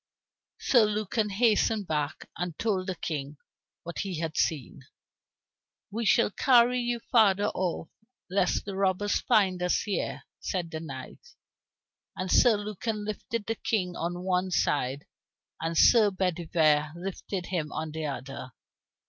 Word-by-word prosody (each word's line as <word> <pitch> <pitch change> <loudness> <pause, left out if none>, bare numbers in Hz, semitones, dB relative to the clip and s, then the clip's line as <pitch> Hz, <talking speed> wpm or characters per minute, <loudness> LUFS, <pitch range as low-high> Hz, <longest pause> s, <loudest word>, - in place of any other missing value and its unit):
Sir 240 -5 +4
Lucan 210 +1 -1
hastened 215 0 +2
back, 150 -3 -3
and 175 -2 -4
told 195 -5 -1
the 185 - -2
King 145 -3 -4 0.5
what 170 - -6
he 190 -4 -3
had 160 -2 -3
seen. 145 -3 -1 1.1
"We 225 +2 -2
will 230 - +2
carry 250 +1 +4
you 240 -1 -2
farther 205 -3 +4
off, 180 -3 -2 0.4
lest 185 -1 +1
the 200 -1 -5
robbers 195 +1 +1
find 190 -4 +2
us 180 0 +1
here," 200 -4 -3 0.2
said 175 -3 -3
the 160 - -4
knights. 155 - -10 0.8
And 185 0 -3
Sir 235 -4 +5
Lucan 210 +1 -4
lifted 215 +1 -4
the 225 - -1
King 185 -5 -1
on 175 +2 -3
one 185 0 0
side 145 -4 0 0.6
and 165 0 -2
Sir 220 +2 +6
Bedivere 160 -5 +1
lifted 185 +1 -5
him 165 -6 -3
on 155 0 -4
the 155 0 -3
other. 130 -1 -6
185 Hz, 140 wpm, -28 LUFS, 160-210 Hz, 1.1 s, Sir